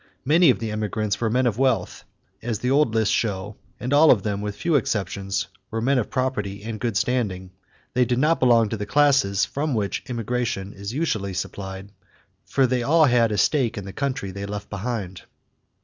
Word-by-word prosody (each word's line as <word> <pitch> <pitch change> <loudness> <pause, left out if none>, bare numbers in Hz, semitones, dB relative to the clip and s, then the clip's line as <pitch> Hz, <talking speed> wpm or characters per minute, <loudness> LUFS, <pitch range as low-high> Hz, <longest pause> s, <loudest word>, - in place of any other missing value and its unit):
Many 160 +3 +5
of 125 - +4
the 115 -2 -4
emigrants 105 0 -2
were 115 - +1
men 125 +3 +1
of 115 -1 0
wealth, 130 -3 0 0.4
as 115 -1 -2
the 125 +5 -1
old 135 -5 +3
lists 110 -2 +2
show, 105 -1 -2 0.2
and 125 +3 -2
all 150 +2 +6
of 100 -6 +5
them, 105 -1 -2
with 105 -1 -4
few 170 +7 -1
exceptions, 100 - -1 0.2
were 115 - -3
men 130 +3 +2
of 115 - -3
property 105 -7 -2
and 110 -1 -5
good 115 -2 -1
standing. 100 -7 -1 0.4
They 125 - +3
did 120 +1 0
not 155 +5 +2
belong 115 -4 +4
to 110 - -3
the 105 0 -5
classes 135 -7 +3
from 145 -1 -2
which 100 -3 -1
emigration 115 -4 -2
is 100 +2 -6
usually 110 - -2
supplied, 95 +1 -6 0.5
for 135 - +2
they 125 0 0
all 155 +6 +4
had 120 -4 +3
a 105 - -1
stake 130 -5 +1
in 100 - -5
the 95 - -8
country 135 -8 -3
they 100 +1 -6
left 105 0 -6
behind." 100 -3 -4
115 Hz, 195 wpm, -23 LUFS, 100-130 Hz, 0.5 s, all